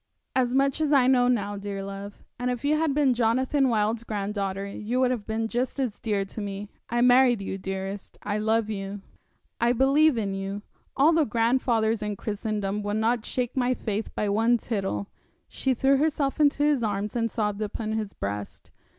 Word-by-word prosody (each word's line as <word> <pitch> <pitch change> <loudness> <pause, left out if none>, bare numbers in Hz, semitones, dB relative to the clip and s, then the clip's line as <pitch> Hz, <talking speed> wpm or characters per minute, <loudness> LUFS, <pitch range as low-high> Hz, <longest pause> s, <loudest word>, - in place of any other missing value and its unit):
'As 250 -2 +2
much 275 +2 +2
as 305 -2 +1
I 275 -4 +5
know 250 -1 +4
now, 205 -4 0
dear 200 -1 -5
love. 200 +1 -8 0.2
If 250 +1 -2
you 300 +1 +3
had 305 -2 +1
been 285 -4 +4
Jonathan 255 +4 +2
Wild's 220 0 +1
granddaughter 200 -2 -3
you 215 +5 -3
would 255 -1 +3
have 230 -5 -3
been 225 0 -1
just 245 +4 -2
as 250 -6 -2
dear 205 -3 -1
to 205 +3 -7
me. 200 0 -5 0.2
I 240 +1 +1
married 250 -1 +5
you, 195 0 -4
dearest; 190 +1 -5
I 205 +1 -1
love 220 0 +1
you; 200 -1 -5 0.6
I 235 +1 +3
believe 275 +3 +4
in 200 -3 -1
you. 195 +1 -4 0.3
All 300 +5 +5
the 320 -1 +4
grandfathers 230 -1 +1
in 210 -1 -2
Christendom 210 -1 -3
would 205 +1 -2
not 225 +1 +1
shake 250 -1 -2
my 255 -1 +1
faith 215 -2 -3
by 210 - 0
one 225 +4 +3
tittle.' 195 - -3 0.4
She 265 -1 -1
threw 270 +3 +3
herself 285 -1 0
into 290 -1 +3
his 295 -4 +3
arms, 210 -1 -2
and 230 -1 +1
sobbed 210 -2 -2
upon 215 +1 -3
his 215 -2 -3
breast. 100 +1 -6
225 Hz, 185 wpm, -26 LUFS, 205-255 Hz, 0.6 s, I